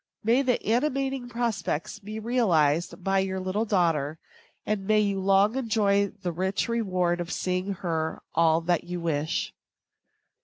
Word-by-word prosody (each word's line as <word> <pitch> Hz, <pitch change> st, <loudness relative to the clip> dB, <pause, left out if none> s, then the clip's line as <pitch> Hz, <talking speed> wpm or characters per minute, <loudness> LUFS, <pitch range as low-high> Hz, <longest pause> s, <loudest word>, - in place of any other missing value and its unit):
May 235 Hz, +5 st, +4 dB
these 255 Hz, -3 st, +2 dB
animating 265 Hz, +1 st, 0 dB
prospects 230 Hz, -6 st, -2 dB
be 210 Hz, +1 st, -7 dB
realized 180 Hz, -, +1 dB
by 195 Hz, +1 st, +2 dB
your 190 Hz, 0 st, -1 dB
little 185 Hz, +4 st, -1 dB
daughter, 165 Hz, -7 st, +1 dB, 0.5 s
and 205 Hz, -2 st, -2 dB
may 215 Hz, 0 st, +4 dB
you 200 Hz, -2 st, 0 dB
long 195 Hz, +3 st, +3 dB
enjoy 210 Hz, -5 st, +2 dB
the 180 Hz, -2 st, -5 dB
rich 190 Hz, +4 st, -1 dB
reward 185 Hz, -7 st, 0 dB
of 175 Hz, 0 st, -5 dB
seeing 185 Hz, +2 st, -1 dB
her 160 Hz, -2 st, -2 dB
all 165 Hz, 0 st, +3 dB
that 170 Hz, 0 st, +1 dB
you 175 Hz, 0 st, -4 dB
wish. 160 Hz, +1 st, -1 dB
195 Hz, 145 wpm, -27 LUFS, 175-220 Hz, 0.5 s, May